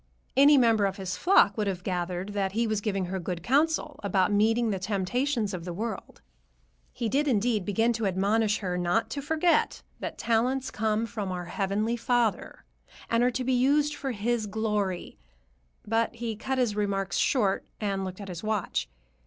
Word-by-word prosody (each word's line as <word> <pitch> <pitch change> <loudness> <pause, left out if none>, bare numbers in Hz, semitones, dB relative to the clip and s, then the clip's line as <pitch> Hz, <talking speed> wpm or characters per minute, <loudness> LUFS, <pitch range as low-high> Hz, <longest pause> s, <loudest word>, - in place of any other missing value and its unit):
Any 285 +2 +7
member 225 -5 +4
of 195 - -5
his 185 -2 -4
flock 200 - +4
would 210 - 0
have 180 -2 -3
gathered 180 +1 -3
that 195 -2 -2
he 230 +2 +1
was 215 -2 -1
giving 195 -3 -1
her 190 +2 -3
good 175 -1 -4
counsel 300 - +1
about 195 0 +2
meeting 225 +2 +2
the 195 - -2
temptations 210 +4 -1
of 175 -2 -5
the 175 0 -5
world. 220 +2 -5 0.7
He 235 - -3
did, 280 +7 +1
indeed, 220 -4 +1
begin 225 +4 +2
to 225 -2 -1
admonish 205 +3 +1
her 180 -2 -2
not 175 +6 0
to 280 - -3
forget 320 +4 +1 0.2
that - - -5
talents 250 +3 0
come 220 +1 0
from 210 -4 -4
our 180 -1 -4
Heavenly 205 +6 -1
Father 240 -2 0 0.5
and 230 0 +3
are 250 - +4
to 255 +1 -3
be 260 +1 +1
used 285 +4 +3
for 275 - -4
his 225 0 -1
glory, 205 -4 -2 0.7
but 225 +2 0
he 230 -1 -4
cut 265 +5 -3
his 240 -5 +1
remarks 200 -2 -1
short 205 -8 +1
and 195 -2 -1
looked 185 0 -6
at 200 - -7
his 180 -2 -6
watch. 215 -3 -2
215 Hz, 180 wpm, -27 LUFS, 195-240 Hz, 0.7 s, Any